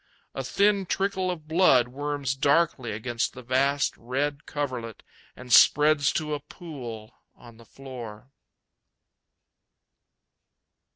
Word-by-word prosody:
A 135 - -4
thin 200 +7 +1
trickle 190 0 -1
of 160 -4 -5
blood 155 -8 +4
worms 145 0 -3
darkly 140 -3 +1
against 115 +2 -2
the 125 - -11
vast 135 +3 +1
red 140 +4 -3
coverlet 125 -6 -5 0.3
and 125 -1 -5
spreads 150 0 +5
to 150 -2 -2
a 145 - -2
pool 135 - -9 0.2
on 120 -2 -16
the 115 - -16
floor. 125 -2 -10
135 Hz, 110 wpm, -26 LUFS, 120-150 Hz, 0.3 s, spreads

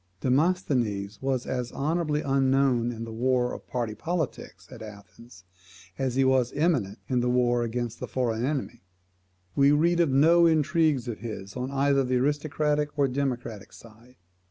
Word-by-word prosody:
Demosthenes 125 - 0
was 130 -2 -1
as 125 -2 -3
honourably 155 0 -1
unknown 135 -3 +2
in 115 -1 -6
the 115 -1 -7
war 125 +1 +1
of - - -9
party 120 -3 -3
politics 165 +3 -4
at - - -11
Athens, 105 -1 -13 0.6
as 130 -2 -1
he 135 - +3
was 130 -2 +2
eminent 135 - 0
in 125 -2 +1
the 125 0 0
war 120 -1 +2
against 120 0 -3
the - - -5
foreign 120 -3 -1
enemy. 135 -3 -3 0.7
We 140 0 +5
read 170 +4 +3
of 170 -3 +3
no 165 +6 +5
intrigues 155 -4 +2
of 115 -3 -5
his 100 -3 -7
on 125 +1 -3
either 140 0 +2
the 130 0 -1
aristocratic 150 +2 0
or 140 -1 +3
democratic 125 -6 -3
side. 115 +3 -16
130 Hz, 155 wpm, -26 LUFS, 120-145 Hz, 0.7 s, We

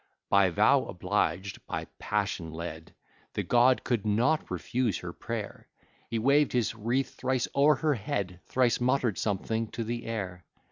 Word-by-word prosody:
By 100 -2 +5
vow 85 - +4
oblig'd, 95 +1 -1
by - - -3
passion 100 -5 -1
led, 80 0 -7 0.4
The - - -1
god 125 +1 +4
could 120 -5 0
not 115 +9 +1
refuse 120 -8 -1
her - - -7
prayer: - - -6 0.4
He 115 - -1
way'd 140 +5 +3
his 120 -3 +1
wreath 120 +4 -1
thrice 130 -1 -1
o'er 145 +2 +5
her 155 +2 +1
head, 100 -6 -3
Thrice 125 -2 +2
mutter'd 125 -4 +1
something 110 +2 -1
to 115 - -2
the 115 +1 -4
air. 95 -6 -4
115 Hz, 150 wpm, -29 LUFS, 100-130 Hz, 0.4 s, By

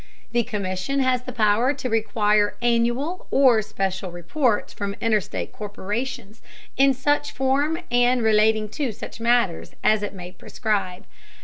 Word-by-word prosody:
The 240 - +2
Commission 210 +3 -2
has 255 -1 +2
the 255 - -7
power 230 +3 +2
to 265 - -4
require 210 -2 +1
annual 240 +8 0
or 255 -5 +5
special 190 -2 -3
reports 210 - -1
from 200 -1 -4
interstate 220 -3 -1
corporations 215 +2 -5 0.3
in 270 0 +4
such 290 +3 0
form 275 +5 +1
and 245 0 +3
relating 215 0 +3
to 255 0 -3
such 205 - -9
matters 230 -7 +1
as 215 -1 +3
it 205 -1 -5
may 180 -1 -8
prescribe. 195 -3 -3
225 Hz, 135 wpm, -23 LUFS, 205-255 Hz, 0.3 s, or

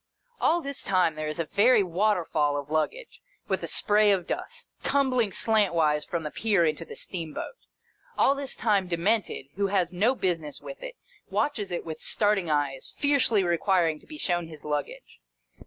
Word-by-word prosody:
All 345 +1 +2
this 280 -2 -6
time, 185 -4 +2
there 155 0 -4
is 155 - -4
a 165 - -1
very 215 +6 +4
water 185 +1 +1
fall 145 -2 0
of 145 +1 -6
luggage, 445 - -2 0.3
with - - -1
a - - -4
spray 210 0 +3
of 185 -3 +1
dust, 485 0 -5
tumbling 255 -5 +2
slantwise 170 -9 +2
from 170 -2 -3
the 150 - -5
pier 205 -6 +2
into 155 +1 -1
the - - -10
steamboat. 165 - -5 0.6
All 275 - +4
this 280 -2 -5
time, 205 -4 +1
Demented 175 -4 -1
(who 200 0 +1
has 185 -3 0
no 220 +9 +2
business 165 - -2
with - - -10
it) - - -7 0.3
watches 225 -10 -1
it 175 - -4
with 160 -1 -6
starting 205 -5 +2
eyes, 145 -3 -1
fiercely 275 -8 +3
requiring 170 -2 +1
to - - -22
be 305 - -9
shown 175 - 0
his 155 -2 -12
luggage. 150 -1 -4
185 Hz, 175 wpm, -27 LUFS, 160-225 Hz, 0.6 s, very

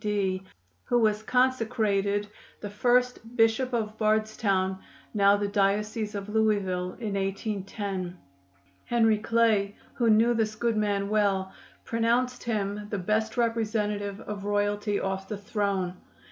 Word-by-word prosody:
D., 195 -3 0 0.4
who 245 - +2
was 215 -2 +2
consecrated 220 -5 +1 0.3
the 205 - -6
first 245 +1 +1
Bishop 225 +3 +3
of 220 -2 -2
Bardstown 215 -3 +1 0.3
(now 200 -1 +5
the 205 0 -1
Diocese 210 +2 0
of 200 0 -4
Louisville) 200 -4 0
in 215 -4 -3
1810. 195 -2 -3 0.7
Henry 225 -3 +3
Clay, 215 -2 +2 0.2
who 235 -2 +1
knew 225 +2 +5
this 220 -2 0
good 230 0 0
man 205 -2 0
well, 200 -2 +1 0.3
pronounced 240 +2 +1
him 205 -2 -2
"the 205 - -2
best 215 +5 -1
representative 210 -3 -1
of 210 -2 -6
royalty 205 0 0
off 195 0 -3
the 210 - -3
throne." 200 -3 -1
210 Hz, 125 wpm, -27 LUFS, 200-225 Hz, 0.7 s, now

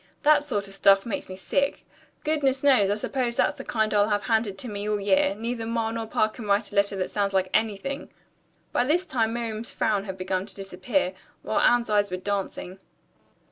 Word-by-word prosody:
That 300 0 +5
sort 205 -9 -2
of 195 - -11
stuff 195 0 +4
makes 230 - -4
me 185 - -6
sick. 280 +9 -1 0.4
Goodness 285 -4 +1
knows, 255 -9 +5
I 205 - +2
suppose 240 +2 -2
that's - - +2
the - - -7
kind 220 -2 0
I'll 205 0 +3
have 205 -1 +1
handed 220 -4 0
to 250 - -5
me 205 -1 -4
all 210 -1 0
year. 195 -1 +2
Neither 230 0 -3
Ma 230 -1 -1
nor 225 -1 -4
Pa 215 - +2
can 215 0 -9
write 205 +3 +1
a - - -9
letter 200 0 +2
that 185 -1 -2
sounds 200 -1 0
like 190 -1 +1
anything." 225 +7 -1 0.6
By - - +2
this 340 +7 +2
time 225 -8 0
Miriam's 230 -1 -4
frown 205 -2 0
had 190 -2 -6
begun 185 +1 -2
to 195 - -11
disappear, 200 +9 -1 0.3
while - - 0
Anne's 240 -2 +3
eyes 205 -1 +3
were 185 - -3
dancing. 195 -1 -4
215 Hz, 210 wpm, -26 LUFS, 195-240 Hz, 0.6 s, That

